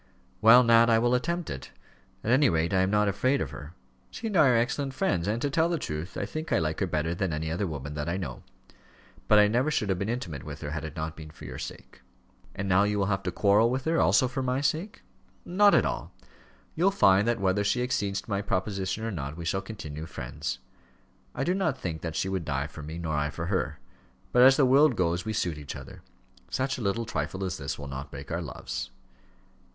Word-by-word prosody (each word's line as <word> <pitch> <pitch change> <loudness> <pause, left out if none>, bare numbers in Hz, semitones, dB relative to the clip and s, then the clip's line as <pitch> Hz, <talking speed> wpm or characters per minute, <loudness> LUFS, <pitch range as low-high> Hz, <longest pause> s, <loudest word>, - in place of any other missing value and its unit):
"Well, 115 +3 +8
Nat, 115 0 +6
I 115 - +5
will 120 +2 +2
attempt 170 +7 -1
it. 65 - -7 0.5
At 115 - 0
any 135 +3 +5
rate, 85 +1 0
I 95 - +4
am 95 - +2
not 105 0 +2
afraid 130 +8 +1
of 70 - -3
her. 75 +4 -10 0.3
She 230 - -8
and 215 -3 -2
I 155 -5 +6
are 125 - +4
excellent 130 +3 -1
friends, 100 - 0
and, 110 +3 0
to 145 - +1
tell 165 +3 +2
the 170 - 0
truth, 80 - -5
I - - -1
think 155 +1 -6
I - - +4
like 80 -2 -1
her 95 - 0
better 80 0 -1
than 90 0 -1
any 80 +1 -3
other 90 +4 -1
woman 75 -2 -5
that 75 +2 -3
I 90 - -1
know; 95 - -5 0.9
but 105 - +6
I 105 0 +7
never 125 +7 +1
should 110 -9 0
have 95 -2 0
been 100 +3 -2
intimate 90 - -4
with - - -8
her, 75 - -5
had 80 +1 -4
it 80 -1 -7
not 80 0 -4
been 80 -1 -10
for 75 -1 -12
your 60 -1 -7
sake." - - -9 0.5
"And 100 - -3
now 95 +1 +4
you 105 0 +1
will 100 - +1
have 95 - -2
to 90 - -3
quarrel 105 +5 +4
with 130 +1 -2
her, 165 +1 +2
also 130 - +4
for 130 +2 -3
my 130 0 0
sake?" 160 +8 -2 0.4
"Not 200 +3 +5
at - - +4
all. - - -3 0.6
You'll 180 +5 +3
find 100 - +4
that 120 -1 +1
whether 95 +1 +1
she 115 +5 +1
accedes 100 -5 -1
to - - -18
my 100 0 0
proposition 95 +1 -2
or 115 - -2
not, 75 -4 -5
we 85 - -6
shall 95 +3 0
continue 80 -7 -7
friends. 65 -4 -5 0.8
I 135 - -1
do 175 - +1
not 165 -8 0
think 85 -9 -4
that 80 -2 -4
she 95 - 0
would 95 -3 -2
die 70 -2 -2
for 75 +1 -9
me 80 +3 -7
nor 85 -2 -3
I 75 0 0
for - - -5
her. - - -1 0.5
But 125 - +4
as 130 +1 +8
the 140 - +5
world 135 +1 +5
goes 85 0 0
we 110 - -2
suit 85 -7 -1
each 75 0 -7
other. 65 -2 -10 0.5
Such 130 0 -1
a - - -5
little 110 +3 -1
trifle 95 0 -3
as 90 -4 -3
this 70 -2 -4
will 70 - -7
not 70 0 -6
break - - -9
our - - -1
loves." 65 - -5
100 Hz, 240 wpm, -28 LUFS, 80-125 Hz, 0.9 s, Well